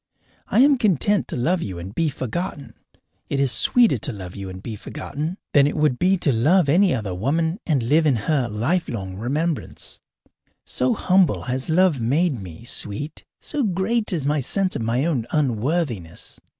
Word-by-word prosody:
I 235 Hz, -, +3 dB
am 280 Hz, -1 st, +5 dB
content 205 Hz, -, +2 dB
to -, -, -5 dB
love 170 Hz, +9 st, +1 dB
you 95 Hz, -, -5 dB
and 90 Hz, +3 st, -7 dB
be 165 Hz, +4 st, +1 dB
forgotten. 145 Hz, -, -4 dB, 0.6 s
It 140 Hz, -, -1 dB
is 135 Hz, -2 st, +2 dB
sweeter 235 Hz, -, +3 dB
to 140 Hz, -, -3 dB
love 95 Hz, -5 st, -8 dB
you 100 Hz, -1 st, -6 dB
and 95 Hz, 0 st, -8 dB
be 115 Hz, -, -5 dB
forgotten 155 Hz, -, -5 dB, 0.2 s
than 140 Hz, -1 st, +6 dB
it 145 Hz, -, -3 dB
would 150 Hz, -5 st, +2 dB
be 185 Hz, +2 st, +3 dB
to 165 Hz, -5 st, +1 dB
love 150 Hz, +9 st, +3 dB
any 180 Hz, +5 st, +4 dB
other 105 Hz, -, -2 dB
woman 160 Hz, -, 0 dB
and 145 Hz, -7 st, +1 dB
live 155 Hz, +7 st, +3 dB
in 140 Hz, -, +3 dB
her 130 Hz, +3 st, 0 dB
lifelong 115 Hz, -, -2 dB
remembrance: 150 Hz, +8 st, -3 dB, 0.6 s
so 125 Hz, 0 st, 0 dB
humble 185 Hz, -1 st, +2 dB
has 130 Hz, +3 st, -3 dB
love 165 Hz, -5 st, +3 dB
made 140 Hz, -, +1 dB
me, 90 Hz, +3 st, -10 dB
sweet, 120 Hz, +6 st, -3 dB, 0.2 s
so 295 Hz, -2 st, -2 dB
great 210 Hz, +3 st, 0 dB
is 160 Hz, -7 st, -1 dB
my 150 Hz, +1 st, +1 dB
sense 185 Hz, +8 st, 0 dB
of -, -, -2 dB
my 120 Hz, +5 st, 0 dB
own 130 Hz, -9 st, -1 dB
unworthiness. 130 Hz, -, -2 dB
145 Hz, 175 wpm, -22 LUFS, 115-175 Hz, 0.6 s, than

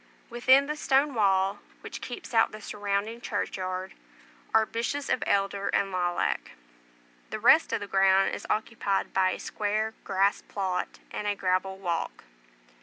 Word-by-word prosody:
Within 260 Hz, +3 st, +5 dB
the 300 Hz, +1 st, -3 dB
stone 280 Hz, -1 st, +2 dB
wall, 195 Hz, -2 st, +2 dB, 0.2 s
which -, -, -8 dB
keeps 245 Hz, -, -7 dB
out 225 Hz, -1 st, +4 dB
the 215 Hz, -, -9 dB
surrounding 205 Hz, +2 st, -3 dB
churchyard, 185 Hz, -3 st, -3 dB, 0.6 s
are 220 Hz, 0 st, +4 dB
bushes 235 Hz, +6 st, -3 dB
of -, -, +1 dB
elder 200 Hz, 0 st, +1 dB
and 200 Hz, -1 st, +1 dB
lilac; 175 Hz, -1 st, -1 dB, 0.8 s
the -, -, -4 dB
rest -, -, +5 dB
of -, -, -1 dB
the -, -, -3 dB
ground 195 Hz, 0 st, +4 dB
is -, -, -6 dB
occupied 215 Hz, -3 st, -1 dB
by 190 Hz, -1 st, +3 dB
a -, -, -3 dB
square 215 Hz, +1 st, -2 dB
grass 195 Hz, +2 st, +1 dB
plot 190 Hz, -3 st, -3 dB
and 210 Hz, -, -4 dB
a 205 Hz, -, +1 dB
gravel 190 Hz, 0 st, 0 dB
walk. 175 Hz, -4 st, -3 dB
200 Hz, 150 wpm, -28 LUFS, 190-220 Hz, 0.8 s, Within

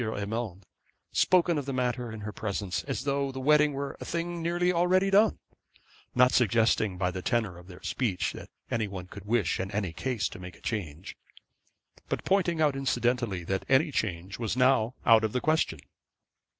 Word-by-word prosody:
Urmand, 105 Hz, -3 st, -4 dB, 0.5 s
spoken 175 Hz, -3 st, +3 dB
of 140 Hz, -, -6 dB
the 135 Hz, -, -2 dB
matter 125 Hz, -2 st, -1 dB
in 110 Hz, -1 st, -7 dB
her 105 Hz, +1 st, -5 dB
presence, 100 Hz, -3 st, -3 dB
as 135 Hz, -2 st, -3 dB
though 140 Hz, -1 st, 0 dB
the 130 Hz, -, -6 dB
wedding 150 Hz, +2 st, +4 dB
were 140 Hz, 0 st, -4 dB
a -, -, -3 dB
thing 170 Hz, 0 st, -3 dB
already 175 Hz, +1 st, +2 dB
nearly 185 Hz, +3 st, +2 dB
done; 210 Hz, +2 st, +5 dB, 0.8 s
not 125 Hz, 0 st, +5 dB
suggesting 110 Hz, -4 st, +2 dB
by 90 Hz, 0 st, 0 dB
the 95 Hz, -, -5 dB
tenor 105 Hz, -5 st, -1 dB
of 90 Hz, -, -15 dB
their 90 Hz, -2 st, -13 dB
speech 110 Hz, -9 st, -1 dB
that -, -, -10 dB, 0.2 s
any 110 Hz, -2 st, 0 dB
one 95 Hz, -3 st, -7 dB
could 100 Hz, +2 st, -11 dB
wish 105 Hz, -6 st, +1 dB
in 95 Hz, +1 st, -2 dB
any 100 Hz, -4 st, -2 dB
case 125 Hz, +2 st, -1 dB
to -, -, -10 dB
make 90 Hz, -1 st, -9 dB
a -, -, -20 dB
change, 90 Hz, -7 st, -5 dB, 0.9 s
but -, -, -3 dB
pointing 180 Hz, -4 st, +2 dB
out 150 Hz, -3 st, +3 dB
incidentally 120 Hz, -7 st, 0 dB
that 95 Hz, +2 st, -2 dB
any 140 Hz, +4 st, +4 dB
change 95 Hz, -5 st, -3 dB
was 115 Hz, 0 st, -2 dB
now 125 Hz, -2 st, +3 dB
out 115 Hz, -1 st, +6 dB
of 110 Hz, -, -1 dB
the 125 Hz, -, +1 dB
question. 155 Hz, +4 st, +1 dB
120 Hz, 185 wpm, -28 LUFS, 100-140 Hz, 0.9 s, out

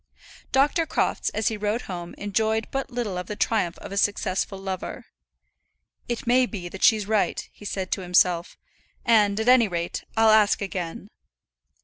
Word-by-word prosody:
Dr. 290 Hz, +5 st, +2 dB
Crofts -, -, 0 dB
as 220 Hz, -, 0 dB
he 220 Hz, -, -4 dB
rode 210 Hz, +3 st, -1 dB
home 175 Hz, -2 st, -7 dB
enjoyed 220 Hz, +2 st, 0 dB
but 270 Hz, 0 st, -3 dB
little 235 Hz, -7 st, -3 dB
of 180 Hz, -, -6 dB
the 210 Hz, -, -5 dB
triumph 205 Hz, -6 st, 0 dB
of -, -, -10 dB
a 200 Hz, -, -4 dB
successful 195 Hz, -1 st, 0 dB
lover. 190 Hz, -1 st, -5 dB, 1.0 s
"It 240 Hz, -, -3 dB
may 250 Hz, +1 st, +4 dB
be 185 Hz, -7 st, -6 dB
that 190 Hz, -, -9 dB
she's 215 Hz, -2 st, +4 dB
right," 215 Hz, -1 st, 0 dB
he 205 Hz, -, -14 dB
said 190 Hz, -2 st, -4 dB
to 195 Hz, -, -1 dB
himself; 180 Hz, -1 st, +2 dB, 0.5 s
"and, 210 Hz, -3 st, +4 dB
at 220 Hz, -, -2 dB
any 250 Hz, -3 st, +6 dB
rate, 170 Hz, -2 st, -3 dB
I'll 225 Hz, 0 st, +6 dB
ask 215 Hz, -1 st, +4 dB
again." 185 Hz, -2 st, -5 dB
205 Hz, 165 wpm, -25 LUFS, 185-225 Hz, 1.0 s, any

